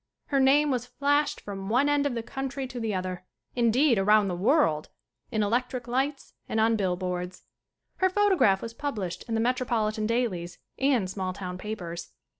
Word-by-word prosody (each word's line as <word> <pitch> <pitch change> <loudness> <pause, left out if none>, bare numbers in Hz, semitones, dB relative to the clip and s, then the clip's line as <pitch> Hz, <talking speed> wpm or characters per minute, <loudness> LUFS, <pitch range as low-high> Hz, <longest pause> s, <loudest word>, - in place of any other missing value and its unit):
Her 275 - +2
name 285 +2 +4
was 250 -1 -1
flashed 285 +3 +1
from 195 -1 -6
one 250 +6 +3
end 290 0 +2
of 260 - -3
the 230 - -3
country 270 +2 -4
to 250 -1 -6
the 225 -2 -1
other, 185 -1 -3 0.3
indeed, 240 +1 +3
around 210 +1 +4
the 180 - -2
world, 185 - +2 0.4
in 215 -1 0
electric 245 +3 -1
lights 270 +3 -2 0.2
and 220 - 0
on 225 +1 +4
bill 190 -4 0
boards. 180 0 -4 0.5
Her 375 - +3
photograph 370 - +3
was 230 - -5
published 215 -10 -4
in 225 - 0
the - - +1
metro 250 +2 0
politan 215 -2 0
dailies 195 -8 -1 0.2
and 265 -8 +2
small 185 -1 -3
town 180 -1 -6
papers. 175 -5 -6
230 Hz, 180 wpm, -27 LUFS, 190-270 Hz, 0.5 s, name